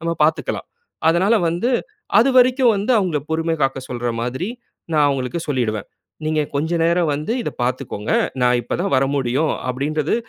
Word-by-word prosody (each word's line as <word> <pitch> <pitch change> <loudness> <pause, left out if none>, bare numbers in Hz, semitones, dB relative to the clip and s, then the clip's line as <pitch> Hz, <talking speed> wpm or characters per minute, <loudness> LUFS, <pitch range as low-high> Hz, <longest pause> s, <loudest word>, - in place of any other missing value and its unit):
நம்ம 170 0 -1
பாத்துக்கலாம். 160 +1 -1 0.4
அதனால 185 +7 +3
வந்து, 175 +9 0 0.5
அதுவரைக்கும் 255 -1 +5
வந்து 205 +6 0
அவங்கள 180 -7 0
பொறுமை 165 +1 0
காக்க 135 0 +1
சொல்ற 120 -1 -2
மாதிரி 130 +9 -3 0.5
நா 155 - +2
அவங்களுக்கு 135 +3 -2
சொல்லிடுவேன். 115 -7 -1 0.4
நீங்க 155 0 +1
கொஞ்சம் 160 +4 0
நேரம் 170 0 +2
வந்து 150 +9 -2
இத - - -3
பார்த்துக்கோங்க. 125 -4 -3 0.3
நா 125 - +4
இப்ப 120 - -3
தான் 195 - -1
வரமுடியும் 135 +2 +1 0.2
அப்டின்றது 150 +4 -1
155 Hz, 145 wpm, -20 LUFS, 130-175 Hz, 0.5 s, அதுவரைக்கும்